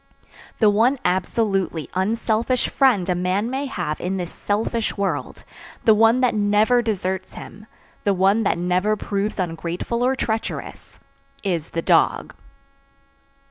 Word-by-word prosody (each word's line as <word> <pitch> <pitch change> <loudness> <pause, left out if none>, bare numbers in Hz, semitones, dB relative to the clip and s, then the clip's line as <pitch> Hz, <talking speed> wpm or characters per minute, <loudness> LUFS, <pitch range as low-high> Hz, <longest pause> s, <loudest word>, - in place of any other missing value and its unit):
The 215 -3 +4
one 235 +7 +3
absolutely 190 -2 0
unselfish 225 +5 0
friend 245 -10 +3
a 180 - +2
man 185 +6 -1
may 275 +2 -2
have 155 - -4
in 190 +2 -2
this 180 -2 -5
selfish 220 +2 -2
world, 200 -1 -3 0.4
the 220 - +7
one 225 +4 +4
that 250 -2 +3
never 210 +3 +3
deserts 190 -4 -3
him, 210 +1 -11 0.4
the 200 -1 +2
one 195 +4 +3
that 200 - +1
never 180 +4 +1
proves 205 +1 -2
ungrateful 175 +5 -3
or 255 +2 +2
treacherous, 225 -3 -4 0.4
is 175 -6 -2
the 165 - -3
dog. - - +2
205 Hz, 135 wpm, -22 LUFS, 185-225 Hz, 0.4 s, the